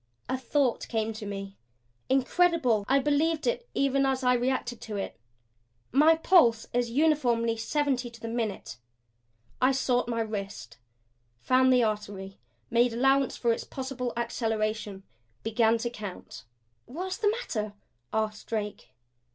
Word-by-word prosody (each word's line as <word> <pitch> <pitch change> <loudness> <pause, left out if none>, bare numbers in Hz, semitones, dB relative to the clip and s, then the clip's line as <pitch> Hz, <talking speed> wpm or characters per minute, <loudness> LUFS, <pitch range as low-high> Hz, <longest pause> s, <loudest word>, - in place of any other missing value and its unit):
A 260 - 0
thought 260 0 0
came 225 -1 -1
to 215 -1 -7
me; 195 0 -6 0.5
incredible 265 - +3
I 270 - +4
believed 300 +3 +1
it 485 0 -1
even 275 0 +2
as 265 -1 0
I 250 0 +4
reacted 245 -1 -1
to 215 - -6
it. 195 - -4 0.8
My 305 +5 +6
pulse 320 -10 +4
is 245 -1 +1
uniformly 245 -5 +2
seventy 260 +1 -1
to 235 0 -14
the 230 - -6
minute. 225 - -3 0.8
I 255 +1 +5
sought 250 -2 +1
my 230 -1 -1
wrist, 200 - -5 0.6
found 260 - +4
the 250 -1 +5
artery, 205 -3 -3 0.3
made 235 0 +3
allowance 270 +3 +2
for 235 -1 +2
its - - -4
possible 260 -2 -4
acceleration, 215 -4 -2 0.4
began 225 +1 +3
to 235 +1 -3
count. 200 - -8 0.4
"What's 365 +9 -4
the 415 - +2
matter?" 225 - -3 0.4
asked 215 -1 -2
Drake. 210 - -4
240 Hz, 135 wpm, -28 LUFS, 220-270 Hz, 0.8 s, My